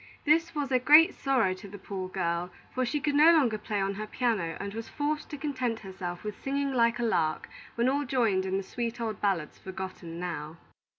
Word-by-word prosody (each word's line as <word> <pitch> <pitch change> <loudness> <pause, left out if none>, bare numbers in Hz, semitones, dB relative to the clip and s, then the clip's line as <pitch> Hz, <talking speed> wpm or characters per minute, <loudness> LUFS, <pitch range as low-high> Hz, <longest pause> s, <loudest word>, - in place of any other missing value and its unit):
This 325 +2 +3
was 285 -2 -2
a 255 - +4
great 300 +6 +7
sorrow 255 -9 +1
to 185 +2 -10
the 205 +1 -9
poor 190 -1 -5
girl; 175 -1 -1 0.2
for 255 - 0
she 295 +5 0
could 290 0 0
no 305 +3 +7
longer 255 -10 +3
play 210 -1 -2
on 195 0 0
her 215 +2 -5
piano, 210 -10 -1
and 200 0 -5
was 225 +1 -6
forced 300 +1 -2
to 295 - -6
content 255 -6 -2
herself 185 -3 -6
with 210 -1 -6
singing 275 0 -1
like 235 -2 +3
a 240 - -2
lark 155 -9 0 0.3
when 235 +1 +2
all 280 +2 +2
joined 230 -8 +1
in 190 +1 0
the 195 - -2
sweet 235 +4 -4
old 220 -3 -3
ballads 190 -7 -1
forgotten 185 -3 -7
now. 165 -3 -5
220 Hz, 215 wpm, -29 LUFS, 190-270 Hz, 0.3 s, great